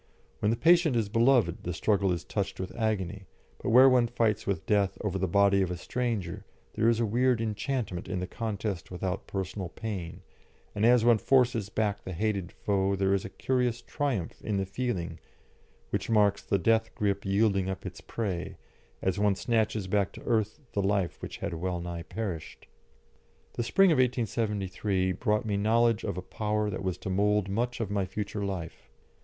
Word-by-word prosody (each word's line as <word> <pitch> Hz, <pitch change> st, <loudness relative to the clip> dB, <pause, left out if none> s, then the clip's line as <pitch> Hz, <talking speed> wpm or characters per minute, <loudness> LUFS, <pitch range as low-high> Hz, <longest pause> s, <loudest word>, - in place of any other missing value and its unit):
When 105 Hz, -, +1 dB
the 115 Hz, -, +1 dB
patient 170 Hz, -3 st, +5 dB
is 110 Hz, -3 st, +1 dB
beloved 115 Hz, -5 st, +3 dB
the 90 Hz, -, -3 dB
struggle 100 Hz, +2 st, +2 dB
is 85 Hz, -1 st, -2 dB
touched 100 Hz, -2 st, -3 dB
with 95 Hz, -, -5 dB
agony, 100 Hz, -4 st, -2 dB, 0.3 s
but -, -, -2 dB
where 130 Hz, +3 st, +8 dB
one 125 Hz, -2 st, +4 dB
fights 115 Hz, -3 st, 0 dB
with 80 Hz, -5 st, -1 dB
Death 100 Hz, -2 st, +2 dB
over 95 Hz, -3 st, -2 dB
the 95 Hz, -, 0 dB
body 100 Hz, +2 st, +4 dB
of 95 Hz, -, 0 dB
a 90 Hz, -, -3 dB
stranger 110 Hz, -5 st, -3 dB, 0.3 s
there 115 Hz, -, +3 dB
is 115 Hz, -1 st, +2 dB
a 115 Hz, -, +2 dB
weird 120 Hz, +2 st, +2 dB
enchantment 110 Hz, -3 st, -2 dB
in 95 Hz, -, -2 dB
the 90 Hz, -, -2 dB
contest 105 Hz, -3 st, -4 dB
without 95 Hz, +1 st, -4 dB
personal 95 Hz, -1 st, -4 dB
pain, 95 Hz, -5 st, -6 dB, 0.5 s
and 105 Hz, +2 st, +2 dB
as 120 Hz, -1 st, +5 dB
one 120 Hz, -2 st, +5 dB
forces 120 Hz, -3 st, +2 dB
back 105 Hz, -2 st, -1 dB
the 95 Hz, -, -6 dB
hated 100 Hz, -1 st, -1 dB
foe 100 Hz, -1 st, 0 dB
there 95 Hz, 0 st, +2 dB
is 100 Hz, -, 0 dB
a -, -, -5 dB
curious 125 Hz, +2 st, 0 dB
triumph 130 Hz, -, -2 dB
in 105 Hz, -2 st, -2 dB
the 95 Hz, -, 0 dB
feeling 95 Hz, -6 st, -3 dB, 0.7 s
which -, -, -2 dB
marks 105 Hz, -2 st, +3 dB
the 100 Hz, -, 0 dB
death 110 Hz, +4 st, +1 dB
grip 100 Hz, -1 st, 0 dB
yielding 100 Hz, -1 st, +2 dB
up 95 Hz, -, -5 dB
its -, -, -7 dB
prey, 95 Hz, -7 st, -4 dB, 0.5 s
as 95 Hz, +1 st, 0 dB
one 105 Hz, -1 st, +3 dB
snatches 110 Hz, -1 st, 0 dB
back 100 Hz, +1 st, +1 dB
to -, -, -11 dB
earth 110 Hz, +1 st, 0 dB
the 100 Hz, -, +1 dB
life 100 Hz, -2 st, 0 dB
which -, -, -6 dB
had -, -, -4 dB
well 90 Hz, +2 st, -2 dB
nigh 85 Hz, -1 st, -5 dB
perished. 90 Hz, -4 st, -6 dB, 0.9 s
The -, -, -2 dB
spring 190 Hz, +10 st, +4 dB
of 155 Hz, -, +3 dB
1873 105 Hz, -6 st, 0 dB
brought 105 Hz, +3 st, 0 dB
me 105 Hz, -2 st, 0 dB
knowledge 115 Hz, +1 st, +3 dB
of -, -, -3 dB
a 90 Hz, -, -4 dB
power 105 Hz, +1 st, -1 dB
that -, -, -4 dB
was 95 Hz, -2 st, -1 dB
to 95 Hz, -, -5 dB
mould 105 Hz, +1 st, +2 dB
much 120 Hz, +5 st, -1 dB
of 110 Hz, -3 st, -2 dB
my 100 Hz, -2 st, 0 dB
future 105 Hz, 0 st, -4 dB
life. 95 Hz, -5 st, -5 dB
105 Hz, 185 wpm, -29 LUFS, 95-115 Hz, 0.9 s, where